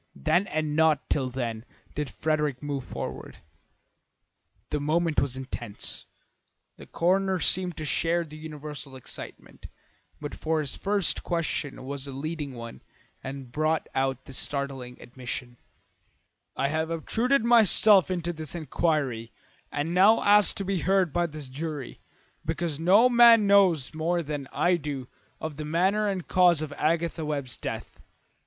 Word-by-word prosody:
Then 175 Hz, -, +1 dB
and 155 Hz, -3 st, -2 dB
not 160 Hz, -2 st, +3 dB
till 130 Hz, -3 st, +1 dB
then 120 Hz, -3 st, -4 dB, 0.3 s
did 150 Hz, -2 st, -3 dB
Frederick 150 Hz, -3 st, -1 dB
move 140 Hz, -2 st, -3 dB
forward. 65 Hz, -, -7 dB, 1.3 s
The 150 Hz, -, 0 dB
moment 160 Hz, +2 st, +1 dB
was 130 Hz, -2 st, -2 dB
intense. 120 Hz, -5 st, -5 dB, 0.7 s
The -, -, -12 dB
coroner 190 Hz, +2 st, +1 dB
seemed 180 Hz, -1 st, +1 dB
to 155 Hz, -, -4 dB
share 170 Hz, +3 st, +1 dB
the 155 Hz, -2 st, -11 dB
universal 150 Hz, -3 st, -8 dB
excitement, 130 Hz, -, -8 dB, 0.7 s
for 160 Hz, 0 st, 0 dB
his 145 Hz, -3 st, -3 dB
first 200 Hz, -3 st, 0 dB
question 160 Hz, -6 st, -3 dB
was 140 Hz, 0 st, -4 dB
a -, -, -6 dB
leading 145 Hz, -1 st, -4 dB
one 115 Hz, -, -9 dB, 0.4 s
and 135 Hz, -2 st, -7 dB
brought 155 Hz, +3 st, 0 dB
out 135 Hz, -1 st, -1 dB
this 135 Hz, -, -4 dB
startling 135 Hz, -3 st, -3 dB
admission: 125 Hz, 0 st, -6 dB, 1.0 s
"I 140 Hz, -, 0 dB
have 160 Hz, +2 st, -1 dB
obtruded 230 Hz, -, +1 dB
myself 215 Hz, -4 st, +6 dB
into 175 Hz, -2 st, -2 dB
this 155 Hz, 0 st, -7 dB
inquiry 145 Hz, -7 st, -1 dB, 0.4 s
and 150 Hz, +4 st, -2 dB
now 200 Hz, +5 st, +5 dB
ask 205 Hz, 0 st, +6 dB
to 195 Hz, -, -3 dB
be 195 Hz, -1 st, 0 dB
heard 190 Hz, -3 st, +2 dB
by 175 Hz, +1 st, +1 dB
this 150 Hz, -3 st, -8 dB
jury, 145 Hz, 0 st, -6 dB, 0.4 s
because 160 Hz, -1 st, -2 dB
no 195 Hz, +9 st, +6 dB
man 235 Hz, -3 st, +7 dB
knows 190 Hz, -9 st, +4 dB
more 170 Hz, +2 st, 0 dB
than 145 Hz, -2 st, -5 dB
I 175 Hz, 0 st, +2 dB
do 140 Hz, -5 st, -5 dB, 0.3 s
of 160 Hz, -2 st, -5 dB
the 150 Hz, -, -5 dB
manner 190 Hz, +7 st, +1 dB
and 190 Hz, -3 st, -3 dB
cause 175 Hz, -4 st, +4 dB
of 145 Hz, -2 st, -6 dB
Agatha 165 Hz, +2 st, 0 dB
Webb's 140 Hz, -4 st, -3 dB
death. -, -, -6 dB
155 Hz, 145 wpm, -27 LUFS, 140-175 Hz, 1.3 s, man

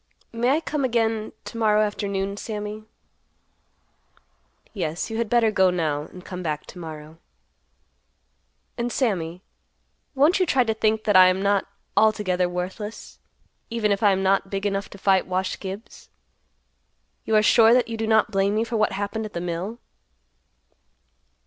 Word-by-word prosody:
"May 235 Hz, +2 st, +1 dB
I 295 Hz, +4 st, +2 dB
come 300 Hz, -3 st, -2 dB
again 225 Hz, -3 st, 0 dB
to 230 Hz, -, -8 dB
morrow 215 Hz, -1 st, +3 dB
afternoon, 200 Hz, -2 st, -2 dB
Sammy?" 210 Hz, 0 st, -6 dB, 1.9 s
"Yes, 170 Hz, +1 st, -3 dB
you 225 Hz, -, -3 dB
had 230 Hz, -2 st, -1 dB
better 235 Hz, -2 st, +3 dB
go 190 Hz, -2 st, +4 dB
now, 155 Hz, -4 st, -1 dB
and 180 Hz, 0 st, -13 dB
come 180 Hz, -1 st, -6 dB
back 150 Hz, -3 st, -3 dB
to 180 Hz, -, -11 dB
morrow." 160 Hz, -1 st, -9 dB, 1.6 s
"And 240 Hz, +1 st, -1 dB
Sammy, 180 Hz, -8 st, -1 dB, 0.7 s
won't 300 Hz, +8 st, +4 dB
you 370 Hz, -, +2 dB
try 265 Hz, -4 st, +3 dB
to 225 Hz, -2 st, 0 dB
think 215 Hz, 0 st, 0 dB
that 210 Hz, -2 st, +1 dB
I 185 Hz, 0 st, +9 dB
am 185 Hz, +1 st, +1 dB
not 200 Hz, -1 st, +1 dB, 0.3 s
altogether 190 Hz, -5 st, +2 dB
worthless, 185 Hz, +5 st, -6 dB, 0.5 s
even 225 Hz, -2 st, 0 dB
if 200 Hz, -, 0 dB
I 205 Hz, -2 st, +5 dB
am 190 Hz, 0 st, 0 dB
not 195 Hz, 0 st, +2 dB
big 195 Hz, +1 st, -3 dB
enough 200 Hz, 0 st, -1 dB
to -, -, -12 dB
fight 190 Hz, -1 st, +2 dB
Wash 185 Hz, 0 st, -2 dB
Gibbs? 195 Hz, +3 st, -9 dB, 1.1 s
You 220 Hz, -, 0 dB
are 215 Hz, -, +5 dB
sure 225 Hz, +1 st, +6 dB
that 245 Hz, -1 st, +4 dB
you 230 Hz, -, -4 dB
do 225 Hz, 0 st, -3 dB
not 220 Hz, -1 st, +3 dB
blame 195 Hz, +1 st, +1 dB
me 220 Hz, -, +2 dB
for 230 Hz, 0 st, -3 dB
what 215 Hz, -1 st, +1 dB
happened 205 Hz, +3 st, -3 dB
at 210 Hz, -, -17 dB
the 170 Hz, -, -3 dB
mill?" 180 Hz, +6 st, -4 dB
205 Hz, 160 wpm, -24 LUFS, 185-225 Hz, 1.9 s, I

